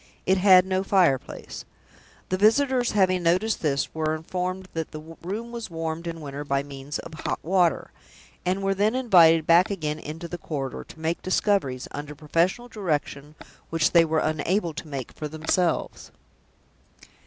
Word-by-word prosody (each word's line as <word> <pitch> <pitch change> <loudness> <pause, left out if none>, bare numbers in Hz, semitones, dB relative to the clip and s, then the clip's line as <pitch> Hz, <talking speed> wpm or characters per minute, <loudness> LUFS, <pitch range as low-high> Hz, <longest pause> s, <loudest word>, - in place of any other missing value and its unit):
It 190 0 +3
had 185 -1 +7
no 190 0 0
fireplace. 180 -10 0 0.7
The 185 - 0
visitors 245 +3 +3
having 185 -3 +3
noticed 185 +6 +1
this, 140 -3 0
were 155 0 -1
informed 185 +3 -4
that 160 -1 -3
the 155 +2 -10
room 215 +7 -5
was 235 -3 -6
warmed 165 0 -4
in 165 -1 -5
winter 145 0 -6
by 140 -1 0
means 140 0 -6
of 165 - -9
hot 155 - -3
water; 175 -2 +1 0.5
and 185 +2 -1
were 195 0 +2
then 210 +4 +1
invited 170 -10 +5
back 175 +4 +5
again 155 -6 -3
into 160 +3 -7
the 175 +1 -6
corridor, 140 -5 -4
to - - -14
make 160 +2 -1
the - - -7
discoveries, 185 -11 +1
under 145 +1 -7
professional 170 - 0
direction, 155 - -3 0.3
which 165 -1 +1
they 170 -1 +6
were 160 -1 0
unable 160 +4 0
to 150 - -7
make 135 -5 -5
for 150 - -6
themselves. 160 +2 -1
165 Hz, 165 wpm, -25 LUFS, 155-190 Hz, 0.7 s, had